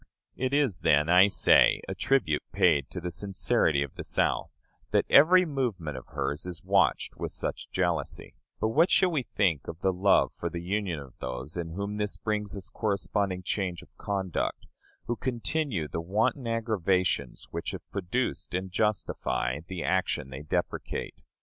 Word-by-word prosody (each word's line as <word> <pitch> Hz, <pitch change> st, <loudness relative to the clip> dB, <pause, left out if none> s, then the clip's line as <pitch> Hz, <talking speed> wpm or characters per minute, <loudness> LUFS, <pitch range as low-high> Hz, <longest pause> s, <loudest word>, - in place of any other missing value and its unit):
It 130 Hz, 0 st, -1 dB
is, 140 Hz, -, +1 dB
then, 75 Hz, +2 st, +3 dB
I 90 Hz, +3 st, +7 dB
say, 100 Hz, -, +5 dB
a -, -, -3 dB
tribute 95 Hz, -, +1 dB
paid 70 Hz, -2 st, +3 dB
to 90 Hz, -, -5 dB
the 90 Hz, 0 st, -4 dB
sincerity 85 Hz, -5 st, +1 dB
of 70 Hz, -, -8 dB
the -, -, -7 dB
South, -, -, -1 dB, 0.3 s
that -, -, +2 dB
every 180 Hz, +6 st, +7 dB
movement 115 Hz, -, -2 dB
of 65 Hz, -, -8 dB
hers 75 Hz, +5 st, -3 dB
is 90 Hz, -2 st, -7 dB
watched -, -, +2 dB
with -, -, -3 dB
such -, -, -4 dB
jealousy; -, -, -2 dB, 0.3 s
but 110 Hz, -, +1 dB
what 160 Hz, +10 st, +4 dB
shall 185 Hz, -2 st, +4 dB
we 155 Hz, -5 st, +1 dB
think 90 Hz, -, 0 dB
of 80 Hz, +2 st, -7 dB
the 95 Hz, -, +2 dB
love 95 Hz, +2 st, +3 dB
for 85 Hz, -, -4 dB
the 85 Hz, 0 st, -6 dB
Union 95 Hz, -2 st, -1 dB
of 70 Hz, -3 st, -12 dB
those 65 Hz, +3 st, -5 dB
in 85 Hz, -2 st, -4 dB
whom 100 Hz, +3 st, -3 dB
this 105 Hz, -1 st, -2 dB
brings 105 Hz, -1 st, -2 dB
us 95 Hz, -, -4 dB
corresponding 100 Hz, -2 st, -1 dB
change 90 Hz, -2 st, -2 dB
of -, -, -22 dB
conduct, 95 Hz, -4 st, -2 dB, 0.4 s
who 120 Hz, -, -1 dB
continue 120 Hz, -, -2 dB
the 80 Hz, -, -4 dB
wanton 115 Hz, -, 0 dB
aggravations 95 Hz, -, 0 dB
which -, -, -3 dB
have -, -, -7 dB
produced 100 Hz, +1 st, -2 dB
and 95 Hz, 0 st, -3 dB
justify 100 Hz, -, -1 dB
the 90 Hz, -3 st, -4 dB
action 85 Hz, -7 st, 0 dB
they 65 Hz, +2 st, -6 dB
deprecate? 75 Hz, -, -3 dB
95 Hz, 170 wpm, -28 LUFS, 85-110 Hz, 0.4 s, I